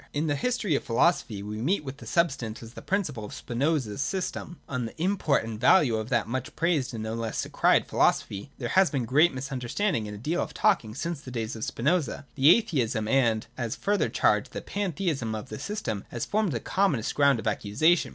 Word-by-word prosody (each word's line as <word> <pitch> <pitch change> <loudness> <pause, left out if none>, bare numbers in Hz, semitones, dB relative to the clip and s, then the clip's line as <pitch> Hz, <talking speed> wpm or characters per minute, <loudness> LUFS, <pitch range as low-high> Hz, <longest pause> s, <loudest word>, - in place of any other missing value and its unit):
In 150 +2 0
the 145 -2 +1
history 230 - 0
of 140 - 0
philosophy 115 - +1
we 105 +1 -5
meet 160 +6 +1
with 140 +1 -8
Substance 130 -10 0
as 115 +1 -11
the - - -9
principle 160 - -2
of 105 - -7
Spinoza's 130 -2 -1
system. 180 +1 -3
On 125 -3 -2
the 115 - -13
import 175 - +1
and 115 -1 -6
value 125 -1 +5
of 110 +2 -4
that 120 -4 +1
much 130 +2 -4
praised 160 -4 +1
and 110 - -4
no 110 0 -3
less 115 -1 -2
decried - - +3
philosophy 100 +5 +1
there - - -4
has 190 -1 +4
been 135 -5 -1
great 150 +9 +4
misunderstanding 130 - -2
and 105 - -6
a - - -9
deal 160 +10 -1
of - - -5
talking 180 - +2
since 170 -2 -3
the 130 - -9
days 115 -2 -3
of 110 - -6
Spinoza. 150 +3 0
The 140 +2 +5
atheism 130 - +2
and, 115 -3 +2
as 115 -3 -2
a - - -19
further 205 0 +1
charge, - - +2
the - - -6
pantheism 165 - -2
of 110 +4 -7
the - - -6
system 115 - -3
has 120 - -3
formed 210 -3 0
the 115 - -1
commonest 170 - 0
ground 140 -2 +4
of 110 - -6
accusation. 110 - +2
135 Hz, 210 wpm, -27 LUFS, 115-170 Hz, -, value